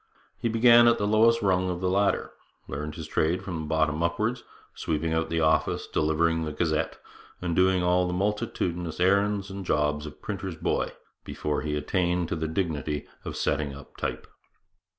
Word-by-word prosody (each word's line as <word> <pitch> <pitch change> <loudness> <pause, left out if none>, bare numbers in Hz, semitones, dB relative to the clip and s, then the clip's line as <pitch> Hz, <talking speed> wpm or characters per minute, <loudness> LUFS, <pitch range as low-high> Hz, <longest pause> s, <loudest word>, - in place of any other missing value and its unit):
He 115 - 0
began 120 +1 +6
at 120 - +5
the 105 - -1
lowest 115 +2 +4
rung 95 -1 +2
of 90 -1 -3
the 90 - -1
ladder, 100 +2 +1 0.4
learned 75 +1 -5
his - - -6
trade 85 +4 0
from 85 -4 -4
the 75 - -6
bottom 80 0 +1
upwards, 105 +9 0 0.3
sweeping 80 0 -2
out 80 0 0
the 80 0 0
office, 80 0 +2
delivering 80 +1 +1
the 80 - -3
Gazette, 80 0 -1 0.4
and 85 -2 -2
doing 95 0 +3
all 90 0 +3
the - - -2
multitudinous 90 -4 -2
errands 100 +2 +2
and 95 0 -6
jobs 75 -2 0
of 75 - -11
printer's 95 -3 -5
boy - - -1 0.3
before 75 -1 -3
he 75 0 -2
attained 85 +3 0
to - - -1
the 80 0 -2
dignity 75 -4 -2 0.2
of - - -6
setting 70 -1 -1
up 70 -1 -13
type. - - -4
85 Hz, 175 wpm, -27 LUFS, 80-95 Hz, 0.4 s, began